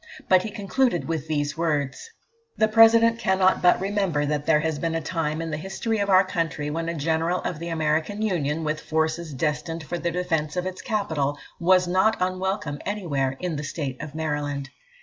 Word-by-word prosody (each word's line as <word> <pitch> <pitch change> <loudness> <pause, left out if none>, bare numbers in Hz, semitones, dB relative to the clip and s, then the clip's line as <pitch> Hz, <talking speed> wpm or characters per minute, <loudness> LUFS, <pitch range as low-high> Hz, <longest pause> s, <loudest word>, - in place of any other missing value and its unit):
But 185 -1 +5
he 215 - -4
concluded 205 0 0
with 160 -2 -3
these 145 -1 -1
words 150 - -1 0.5
"The 220 - +4
President 225 +1 +6
cannot 190 -2 +3
but 180 - +5
remember 195 -7 0
that 145 0 -2
there 155 -2 +4
has 160 -2 -1
been 165 +1 -1
a - - +1
time 160 -1 -2
in 165 - -4
the 150 - -2
history 195 +6 -2
of 200 0 0
our 190 0 +6
country 165 -5 -2
when 165 +2 -2
a 170 - -3
General 165 +3 0
of 160 - -4
the 170 +1 -5
American 160 +6 0
Union, 165 -6 0
with 155 0 -2
forces 160 +1 -1
destined 150 +4 -2
for 175 +3 -4
the 170 - -1
defence 165 -3 -1
of 180 - -1
its 185 0 -5
capital, 160 - -1 0.2
was 180 +1 +4
not 190 +5 +3
unwelcome 185 -4 -2
anywhere 145 -10 -2
in 175 -4 -3
the 150 - -4
State 140 -3 -4
of 150 0 -8
Maryland. 145 -3 -3
165 Hz, 190 wpm, -25 LUFS, 150-185 Hz, 0.5 s, President